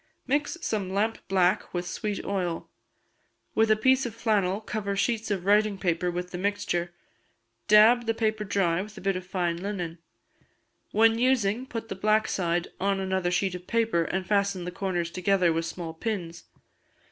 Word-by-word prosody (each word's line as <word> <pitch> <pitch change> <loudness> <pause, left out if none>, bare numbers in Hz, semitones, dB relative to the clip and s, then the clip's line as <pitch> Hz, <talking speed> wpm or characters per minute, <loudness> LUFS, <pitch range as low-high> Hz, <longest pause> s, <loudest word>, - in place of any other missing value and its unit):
Mix 290 +5 0
some 205 -4 -1
lamp 215 +3 0
black 185 -1 +1
with 175 0 -1
sweet 205 +3 -4
oil. 180 -4 -2 0.8
With 220 0 +3
a 215 - +6
piece 260 +4 +3
of 225 - -8
flannel 205 -4 +1
cover 210 -2 -3
sheets 220 +2 0
of 190 -3 -2
writing 210 0 +3
paper 180 -1 0
with 180 +1 -4
the 180 - -5
mixture; 180 -3 -1 0.8
dab 225 +3 +6
the 225 - +1
paper 215 -1 0
dry 185 -4 +1
with 210 +1 -9
a - - -8
bit 195 0 0
of 185 0 -6
fine 175 -3 -1
linen. 175 -3 -4 0.9
When 225 +1 +4
using, 245 -1 +1
put 230 -3 -5
the - - -4
black 215 +3 +2
side 175 -1 -1
on 195 0 +1
another 190 -1 0
sheet 180 +1 0
of 180 0 -8
paper, 225 -7 +1
and 190 +2 -2
fasten 200 -1 +1
the 180 - -4
corners 175 -2 -2
together 180 -1 +2
with 165 0 -1
small 165 0 -5
pins. 170 -3 -4
195 Hz, 170 wpm, -27 LUFS, 180-215 Hz, 0.9 s, a